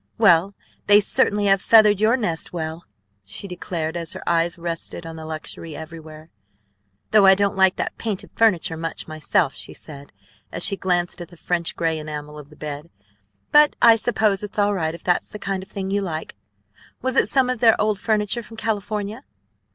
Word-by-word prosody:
"Well, 195 -2 +4 0.3
they 205 0 +7
certainly 205 0 +2
have 195 -1 +3
feathered 215 -3 +5
your 225 +4 +4
nest 175 -9 -2
well!" 160 0 -5 0.4
she 105 - -5
declared 170 -3 -4
as 170 -1 -3
her - - -10
eyes 170 0 +1
rested 170 0 -4
on 165 0 -7
the 160 -1 -8
luxury 160 0 -7
everywhere. 160 0 -10 0.8
"Though 210 -2 +6
I 190 - +8
don't 200 +1 0
like 190 -1 +4
that - - -4
painted 215 -4 -4
furniture 185 -7 +2
much 165 0 -5
myself," 155 -1 0
she - - -11
said 145 -2 -10 0.4
as - - -4
she 200 -1 +2
glanced 175 -1 -1
at 175 - -7
the 175 - -17
French 170 0 -2
gray 165 -1 -1
enamel 150 0 -7
of 145 -1 -13
the 150 - -16
bed; 150 +1 -7 0.6
"but 295 0 +6
I 230 -1 +7
suppose 220 -3 +1
it's 210 0 -8
all 205 0 +2
right 160 -4 -2
if - - -13
that's 175 -1 0
the - - -8
kind 195 -2 -3
of 190 - -12
thing 190 -1 -5
you 200 0 +1
like. 160 -5 -5 0.7
Was 260 -1 -1
it - - +4
some 265 -3 +3
of 255 -2 -2
their 225 -1 +5
old 210 -2 +1
furniture 215 +2 0
from 225 0 -13
California?" 210 -1 -3
185 Hz, 190 wpm, -22 LUFS, 160-210 Hz, 0.8 s, I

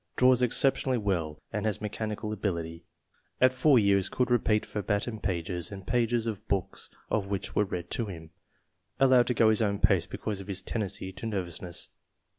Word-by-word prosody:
Draws 125 -1 +5
exceptionally 130 +1 +3
well 85 -8 -2
and 105 +1 -1
has 105 - -1
mechanical 105 0 -4
ability. 85 -5 -3 0.5
"At 130 0 +5
four 135 +1 +4
years 100 -3 +3
could 125 -1 0
repeat 110 -3 +2
verbatim 105 +2 -2
pages 90 -3 -3
and 95 -2 -8
pages 120 0 +1
of 110 -4 -5
books 100 -2 -2 0.2
which 100 -2 -2
were 105 - +3
read 90 -2 -5
to 115 - -1
him." 80 -4 -9 0.7
Allowed 130 -3 +5
to 125 - 0
go 110 -1 +5
his 110 - +1
own 100 -2 +1
pace - - +3
because 100 -2 -4
of 95 - -11
his 95 -2 -4
tendency 95 -3 -3
to 95 +5 -6
nervous 95 -6 -4
ness. 90 -2 -4
105 Hz, 175 wpm, -29 LUFS, 95-115 Hz, 0.7 s, Draws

